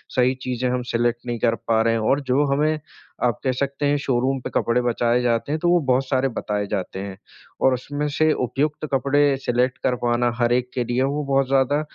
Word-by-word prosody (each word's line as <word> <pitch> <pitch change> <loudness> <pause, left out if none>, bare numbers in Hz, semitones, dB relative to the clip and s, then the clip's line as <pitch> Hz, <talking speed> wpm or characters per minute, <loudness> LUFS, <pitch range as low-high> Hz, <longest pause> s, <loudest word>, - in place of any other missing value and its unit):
सही 130 +1 +3
चीज़ें 125 0 -1
हम 125 0 -1
सेलेक्ट 120 +1 0
नहीं 120 -1 -3
कर 115 -1 +2
पा 110 -1 +3
रहे 115 0 +2
हैं। 115 - 0
और 135 +6 +2
जो 140 +3 +3
हमें 155 +2 +1 0.4
आप 120 -3 +1
कह 130 - +1
सकते 140 +2 -2
हैं 145 +1 +2
शोरूम 135 0 0
पे - - -5
कपड़े 120 +1 +2
बचाए 120 0 +1
जाते 120 +3 0
हैं 155 - -1
तो 175 - +1
वो 175 0 +4
बहुत 130 +2 +2
सारे 135 0 +1
बताए 105 -3 -3
जाते 95 -2 -4
हैं। 95 -1 -6 0.4
और 130 - +4
उसमें 145 +4 -3
से 155 +2 +2
उपयुक्त 145 +5 -2
कपड़े 140 +2 +2 0.2
सेलेक्ट 125 0 0
करवाना 120 -1 +1
हर-एक 120 +1 +1
के 125 - -1
लिए 120 +2 0
वो 145 +2 -1
बहुत 135 -1 +1
ज़्यादा 135 +2 +2
125 Hz, 210 wpm, -22 LUFS, 120-140 Hz, 0.4 s, वो